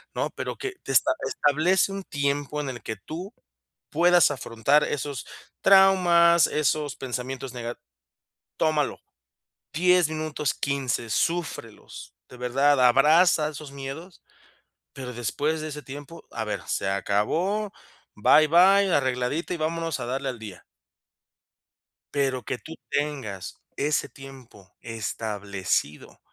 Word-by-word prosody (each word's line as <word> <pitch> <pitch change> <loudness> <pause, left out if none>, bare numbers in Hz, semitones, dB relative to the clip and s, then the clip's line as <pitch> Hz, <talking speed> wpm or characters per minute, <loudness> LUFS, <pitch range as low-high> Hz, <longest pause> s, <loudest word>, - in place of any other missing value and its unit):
¿no?, - - -1
Pero - - -5
que 395 -1 -4
te - - -5
esta 315 - +4 0.2
establece 175 +7 +2
un 195 0 -5
tiempo 145 -1 -2
en 140 - -4
el 120 -2 -7
que 110 - -4
tú 180 +7 -8 0.6
puedas 175 0 +4
afrontar 135 +2 +1
esos 145 -3 -3 0.4
traumas, 180 -3 +6
esos 150 -1 0
pensamientos 130 0 -5
nega 120 -1 -5 0.8
Tómalo, 155 -2 0 0.7
10 180 0 +4
minutos, 155 -2 -2
15, 135 -4 -2
súfrelos, 160 -5 -3 0.2
de 125 - -12
verdad, 135 +3 +2
abraza 150 +5 +5
esos 150 -1 -9
miedos. 140 +6 -8 0.7
Pero 125 -2 -7
después 145 +7 -1
de 155 - -4
ese 150 0 -7
tiempo, 145 +4 -10
a 110 - -4
ver, 105 - -3
se - - -2
acabó, 165 - 0 0.4
bye, 155 0 +5
bye, 190 +4 +5
arregladita 130 +5 0
y - - -3
vámonos 165 0 -2
a - - -3
darle 135 +2 -2
al 125 -2 -5
día. 105 -5 -10 1.5
Pero 135 -3 0
que - - -3
tú 160 - -10 0.2
tengas 135 -10 -3 0.2
ese 150 +2 0
tiempo 130 -9 -14
establecido 100 -7 -3
145 Hz, 125 wpm, -25 LUFS, 125-165 Hz, 1.5 s, traumas